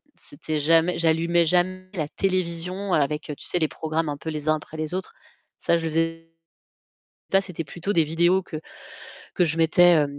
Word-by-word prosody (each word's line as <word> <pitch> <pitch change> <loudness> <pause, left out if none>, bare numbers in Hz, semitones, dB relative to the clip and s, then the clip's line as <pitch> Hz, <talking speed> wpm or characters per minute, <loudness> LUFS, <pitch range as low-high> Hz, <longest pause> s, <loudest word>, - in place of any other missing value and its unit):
c'était 155 +2 -5
jamais, 165 +3 +3
j'allumais 170 +1 +2
jamais 185 +2 0
la 155 -6 -2
télévision 185 +1 -1
avec, 150 0 +1
tu - - -10
sais 180 - 0
les 155 - +2
programmes 160 +1 -2
un 145 - -3
peu 160 - -6
les 155 -1 -4
uns 155 - +4
après 155 +1 -9
les 155 +1 -3
autres. 190 +1 -4 0.5
Ça 170 - +2
je 165 -1 -2
faisais, 165 +1 -1 1.0
pas 195 - +5
c'était 180 -4 -5
plutôt 175 +7 -4
des 165 -4 +4
vidéos 175 +4 +2
que 160 - -7 0.8
que 180 - +2
je 160 0 0
mettais, 165 -1 +5
165 Hz, 175 wpm, -24 LUFS, 155-180 Hz, 1.0 s, pas